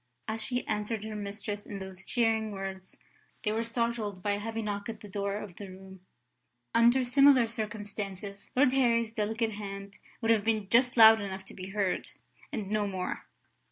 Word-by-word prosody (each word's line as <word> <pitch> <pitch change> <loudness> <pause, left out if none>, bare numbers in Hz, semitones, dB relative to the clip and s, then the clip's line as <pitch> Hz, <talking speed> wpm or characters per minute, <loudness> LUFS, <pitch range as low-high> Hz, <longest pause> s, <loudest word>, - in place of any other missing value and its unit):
As 220 0 -2
she 245 +1 -2
answered 210 0 -2
her 215 0 -5
mistress 205 0 -4
in 205 - -6
those 190 -1 -7
cheering 220 -2 +1
words, 195 -1 -6 0.5
they 210 - +1
were 225 +1 0
startled 230 -5 -2
by 205 - +1
a 205 - 0
heavy 225 +1 -3
knock 205 0 -3
at 225 - -6
the 210 - -9
door 200 0 -2
of 205 -4 -8
the 200 -2 -7
room. 190 0 -12 0.7
Under 240 +3 +5
similar 260 -1 +6
circumstances, 205 -3 -5
Lord 260 0 +5
Harry's 235 -4 +2
delicate 220 +1 0
hand 200 -1 -7 0.2
would 230 -1 +2
have 220 -2 +3
been 220 -2 +1
just 245 +3 +4
loud 220 -1 +9
enough 190 -1 -5
to - - -10
be 185 0 -7
heard, 195 -2 -1 0.4
and 210 -3 -4
no 210 -1 +1
more. 185 -2 -4
210 Hz, 180 wpm, -30 LUFS, 200-230 Hz, 0.7 s, loud